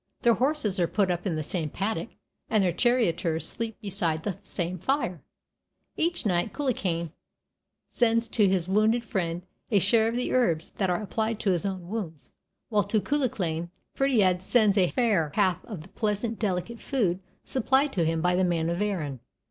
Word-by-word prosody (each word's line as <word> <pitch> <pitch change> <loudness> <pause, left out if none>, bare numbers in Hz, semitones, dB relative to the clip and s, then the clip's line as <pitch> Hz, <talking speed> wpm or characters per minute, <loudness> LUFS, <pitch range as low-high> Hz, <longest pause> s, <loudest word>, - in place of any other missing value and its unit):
Their 235 -2 +6
horses 250 -7 +1
are 170 - +3
put 195 -1 +1
up 175 +3 -2
in 170 - -1
the 155 - -2
same 160 0 -2
paddock 200 +3 -2 0.4
and 215 -3 +3
their 180 - +2
charioteers 170 - +1
sleep 230 -2 -4
beside 175 -6 0
the 195 -2 -3
same 180 -2 -4
fire; 185 - -1 0.7
each 340 -4 0
night 185 +1 +1
Cuchulainn 180 - -1 0.7
sends 230 -1 +2
to 210 -3 +3
his 185 -2 0
wounded 215 +4 +2
friend 175 -4 -2 0.3
a 210 - +3
share 220 +4 +4
of 230 - -1
the 250 - -1
herbs 170 -11 +1
that 190 -3 +2
are 180 +4 0
applied 220 +2 -2
to 195 - +2
his 180 +2 0
own 185 -3 -5
wounds, 165 - -6 0.4
while 210 -3 +2
to 210 +2 +1
Cuchulainn 205 - -1 0.2
Ferdiad 210 -10 +2
sends 210 0 +3
a 185 -4 +3
fair 205 - +1
half 190 -5 +2
of 205 -9 -7
the 185 - -15
pleasant 215 +2 -2
delicate 210 +3 -2
food 195 -10 0 0.2
supplied 265 +3 +1
to 175 - +1
him 165 0 0
by 180 +1 +2
the 185 - +2
men 170 -2 +1
of 170 +3 -2
Erin. 160 -11 -2
195 Hz, 180 wpm, -27 LUFS, 175-230 Hz, 0.7 s, Their